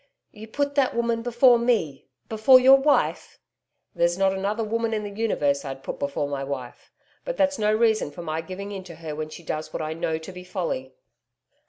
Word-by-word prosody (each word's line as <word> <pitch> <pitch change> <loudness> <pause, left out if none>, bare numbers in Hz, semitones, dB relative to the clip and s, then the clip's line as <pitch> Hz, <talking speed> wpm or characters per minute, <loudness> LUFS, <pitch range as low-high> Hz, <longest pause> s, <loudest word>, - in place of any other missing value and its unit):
'You 220 +1 -11
put 285 +5 -2
that 275 -3 +1
woman 235 -1 0
before 240 +1 +4
ME 215 - 0 0.2
before 225 +4 +6
your 265 +2 +7
wife?' 285 +1 +1 0.6
'There's 170 +1 +1
not 195 0 +2
another 200 +4 -2
woman 225 +1 -1
in 210 - -3
the 205 - -6
universe 150 -10 0
I'd 135 -1 -7
put - - -6
before 140 0 -2
my 140 -1 -3
wife. 135 -3 -7 0.3
But - - -4
that's 285 -2 +1
no 210 0 +2
reason 220 -4 +2
for 160 +4 -9
my 160 0 -3
giving 195 +3 -7
in 195 -2 -6
to 170 -2 -10
her 155 -2 -7
when 155 0 -5
she 170 - -11
does 155 0 -4
what - - -4
I 155 0 -3
know 160 0 -2
to 160 +4 -9
be 180 0 -10
folly.' 170 -8 -4
195 Hz, 205 wpm, -24 LUFS, 155-230 Hz, 0.6 s, your